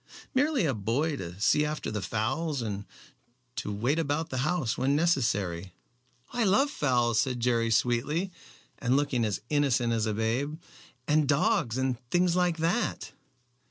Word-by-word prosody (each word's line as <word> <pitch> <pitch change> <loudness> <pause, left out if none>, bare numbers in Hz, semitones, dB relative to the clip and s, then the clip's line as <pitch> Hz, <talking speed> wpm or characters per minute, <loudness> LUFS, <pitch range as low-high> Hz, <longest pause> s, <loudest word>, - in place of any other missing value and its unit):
"Merely 275 - +2
a 140 - +1
boy 125 +9 0
to 90 +1 -7
see 150 +8 +3
after 150 -4 -3
the 105 -2 -3
fowls, 140 +7 -1
and 100 -2 -4 0.7
to - - -3
wait 120 +10 0
about 155 +1 -1
the 130 - -2
house 135 -5 0
when 135 +2 +1
necessary." 100 - 0 0.6
"I 240 - +1
love 260 +9 +3
fowls," 120 - +1
said 125 +2 0
Jerry 115 -1 +1
sweetly, 130 - +1 0.5
and 130 0 +2
looking 140 -4 +1
as 105 -3 -1
innocent 130 -5 +2
as 110 -1 0
a 110 - 0
babe, 125 +8 -1 0.5
"and 150 -1 +3
dogs 145 - +2
and 130 -2 0
things 175 +1 +2
like 180 -2 +2
that." 170 +9 -1
135 Hz, 155 wpm, -28 LUFS, 115-160 Hz, 0.7 s, see